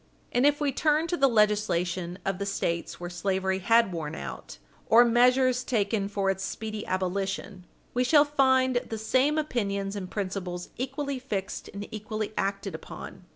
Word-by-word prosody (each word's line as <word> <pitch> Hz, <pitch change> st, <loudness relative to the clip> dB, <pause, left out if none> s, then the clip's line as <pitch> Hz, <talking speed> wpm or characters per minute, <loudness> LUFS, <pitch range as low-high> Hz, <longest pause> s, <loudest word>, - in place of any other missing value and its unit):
And 245 Hz, +4 st, +4 dB
if 290 Hz, 0 st, +2 dB
we 290 Hz, -2 st, +1 dB
turn 305 Hz, +3 st, +2 dB
to 350 Hz, -, +1 dB
the 275 Hz, -4 st, +4 dB
legislation 190 Hz, -6 st, +1 dB
of 195 Hz, -1 st, -1 dB
the 200 Hz, -, -2 dB
States 170 Hz, -4 st, -2 dB
where 175 Hz, -, -5 dB
slavery 190 Hz, +2 st, -1 dB
had 230 Hz, +1 st, +4 dB
worn 155 Hz, -3 st, -4 dB
out, 70 Hz, -, -7 dB, 0.3 s
or 235 Hz, +2 st, +7 dB
measures 250 Hz, +1 st, +4 dB
taken 210 Hz, -4 st, 0 dB
for 195 Hz, -1 st, +1 dB
its 190 Hz, 0 st, -4 dB
speedy 215 Hz, 0 st, -4 dB
abolition, 190 Hz, 0 st, -2 dB, 0.3 s
we 250 Hz, -, +2 dB
shall 290 Hz, +3 st, +5 dB
find 260 Hz, -3 st, +3 dB
the 225 Hz, -2 st, -3 dB
same 260 Hz, +7 st, +2 dB
opinions 200 Hz, -9 st, -1 dB
and 190 Hz, -3 st, -5 dB
principles 185 Hz, -3 st, -4 dB
equally 270 Hz, +2 st, -3 dB
fixed 200 Hz, -7 st, -4 dB
and 200 Hz, +1 st, -6 dB
equally 215 Hz, 0 st, -4 dB
acted 195 Hz, 0 st, -2 dB
upon. -, -, -9 dB
210 Hz, 160 wpm, -27 LUFS, 195-255 Hz, 0.3 s, or